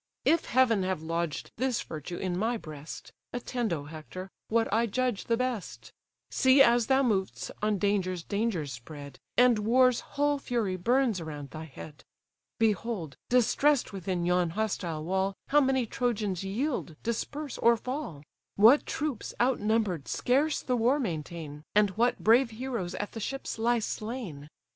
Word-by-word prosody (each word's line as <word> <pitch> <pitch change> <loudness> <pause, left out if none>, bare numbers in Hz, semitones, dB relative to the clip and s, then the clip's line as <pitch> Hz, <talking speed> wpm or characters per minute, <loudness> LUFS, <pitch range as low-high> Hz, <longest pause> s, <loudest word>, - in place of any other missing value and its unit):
If 330 0 +3
Heaven 235 -5 +3
have 185 -4 -2
lodged 165 -1 -3
this 250 -1 0
virtue 160 +2 -6
in 185 -2 -2
my 225 +6 0
breast, 155 -5 -9 0.2
Attend, 245 -2 -2
O 155 -4 -2
Hector! 160 +5 -8 0.2
what 230 0 +2
I 230 +2 +3
judge 250 -1 -1
the 230 - +1
best, 250 -5 -4 0.4
See, 260 +1 +5
as 235 -2 +4
thou 270 0 +4
mov'st, 195 -6 -1
on 210 -1 +1
dangers 185 -3 0
dangers 200 - -1
spread, 140 +2 -10 0.2
And 245 -3 +5
war's 250 +3 +4
whole 290 0 0
fury 230 -8 -1
burns 235 +1 +1
around 150 -3 -7
thy 160 0 -7
head. 150 0 -11 0.5
Behold! 215 - 0
distress'd 250 +3 +3
within 185 -2 -2
yon 180 -1 +2
hostile 175 -5 -2
wall, 190 +3 0
How 295 +1 +5
many 265 -2 +2
Trojans 215 -6 -1
yield, 210 - -2
disperse, 280 +5 -3
or 235 0 +5
fall! 250 - -5 0.3
What 230 +8 +6
troops, 290 -7 -3
out 250 +1 +2
number'd, 210 -8 0
scarce 285 +5 +1
the 250 - 0
war 245 +5 +3
maintain! 160 - -5
And 210 -2 +4
what 235 +5 +1
brave 235 +3 +5
heroes 230 -6 -4
at 205 - -4
the 225 - -6
ships 270 +1 -4
lie 240 +2 +3
slain! 215 - -5
215 Hz, 155 wpm, -29 LUFS, 175-245 Hz, 0.5 s, What